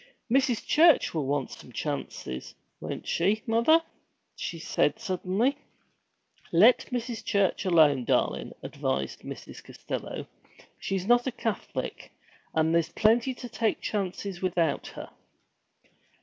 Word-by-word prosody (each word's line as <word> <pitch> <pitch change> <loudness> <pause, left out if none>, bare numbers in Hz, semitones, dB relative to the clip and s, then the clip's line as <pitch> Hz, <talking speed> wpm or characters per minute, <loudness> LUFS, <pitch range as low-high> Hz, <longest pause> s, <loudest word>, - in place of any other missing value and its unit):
'Mrs. 255 -3 +2
Church 320 -2 +5
will 155 -5 -1
want 140 -1 -1
some - - -11
chances, 65 0 -5 0.2
won't - - -6
she, 200 +6 +1
mother?' 240 +9 +4 0.5
she 170 - -5
said 160 +2 +1
suddenly. 215 +6 0 0.9
'Let 210 +9 +6
Mrs. 240 -2 -3
Church 200 0 +1
alone, 150 -8 +4
darlin',' - - 0
advised 65 0 -2
Mrs. - - -9
Costello. - - -6 0.5
'She's 190 -1 -2
not 240 +3 +4
a - - 0
Catholic, 225 -2 -4 0.4
and 160 0 +2
there's 170 0 +2
plenty 230 +7 +2
to 245 - -7
take 225 -2 0
chances 195 -2 -3
without 170 -5 0
her!' - - -9
200 Hz, 120 wpm, -28 LUFS, 165-240 Hz, 0.9 s, Let